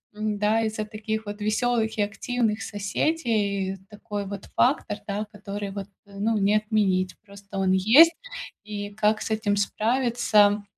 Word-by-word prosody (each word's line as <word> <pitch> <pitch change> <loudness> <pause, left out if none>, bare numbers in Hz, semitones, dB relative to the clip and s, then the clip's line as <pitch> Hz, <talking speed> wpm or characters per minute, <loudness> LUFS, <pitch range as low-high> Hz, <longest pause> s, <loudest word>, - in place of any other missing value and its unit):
н, 215 -1 -2
да, 215 +2 +2
из-за 215 -1 -2
таких 220 0 -4
вот 205 0 -7
веселых 220 +1 +1
и 210 - +2
активных 215 +2 -1
соседей 205 -3 -1
такой 205 -1 -5
вот 195 0 -7
фактор, 250 -5 +2
да, 205 +2 -2
который 200 -1 -6
вот, 200 0 -6 0.2
ну, 205 +2 -1
не 205 +1 +3
отменить. 195 -4 +1
Просто 200 -1 -10
он 190 -1 +2
есть. 255 - +7 0.5
И 205 -1 -5
как 215 +1 +1
с - - -4
этим 205 -2 0
справиться, 215 -2 +2
210 Hz, 145 wpm, -25 LUFS, 200-220 Hz, 0.5 s, есть